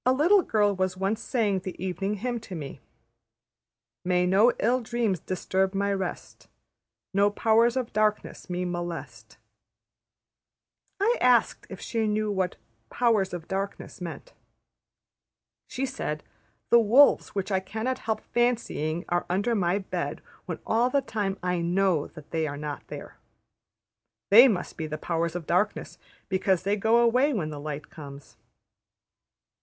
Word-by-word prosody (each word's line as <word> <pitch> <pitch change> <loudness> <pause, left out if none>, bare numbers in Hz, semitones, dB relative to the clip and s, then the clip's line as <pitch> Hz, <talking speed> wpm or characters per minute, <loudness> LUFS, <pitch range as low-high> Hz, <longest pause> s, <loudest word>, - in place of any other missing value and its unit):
A 255 - +4
little 345 +9 +5
girl 205 - +1
was 185 0 -1
once 200 +4 -1
saying 215 -7 0
the 185 0 -7
Evening 195 +2 -2
Hymn 240 +3 -3
to 200 -4 -9
me, 145 -4 -7 1.2
``May 180 0 +2
no 205 +6 +5
ill 250 +3 +1
dreams 230 -5 -1
disturb 190 +2 -1
my 200 +1 +1
rest, 190 -2 -5 0.7
No 200 +1 +4
powers 230 +3 +3
of 250 -3 -3
darkness 215 -2 -1
me 180 0 -2
molest.'' 175 -1 -6 1.6
I 455 +5 +2
asked 250 -2 +3
if 190 - -8
she 225 -2 -1
knew 210 0 0
what 190 -2 -1 0.3
\textit{Powers 220 -6 +2
of 175 -2 -6
Darkness} 195 -1 -5
meant. 180 - -7 1.3
She 265 +1 -3
said, 150 - -4 0.5
``The 235 -1 +7
wolves 255 +4 +5
which 195 +1 -2
I 190 - +2
cannot 220 +7 -3
help 220 -1 -2
fancying 225 -10 -1
are 175 0 -1
under 200 +6 +1
my 185 -3 +1
bed 195 - -4 0.2
when - - -3
all 235 +3 +2
the 275 +1 +1
time 205 -6 -2
I 180 -1 0
know 175 -2 +1
they 160 0 -4
are 145 -1 -5
not 145 0 -6
there. - - -9 1.1
They 235 +6 +10
must 195 -8 -2
be 160 - -3
the 155 0 -4
Powers 170 0 -2
of 175 -3 -4
Darkness, 180 +6 -1 0.3
because 190 -1 +1
they 200 +2 +1
go 220 +3 +3
away 250 +5 +3
when 160 -9 -2
the 145 - -6
light 150 0 -6
comes.'' 140 -5 -11
195 Hz, 145 wpm, -27 LUFS, 175-230 Hz, 1.6 s, They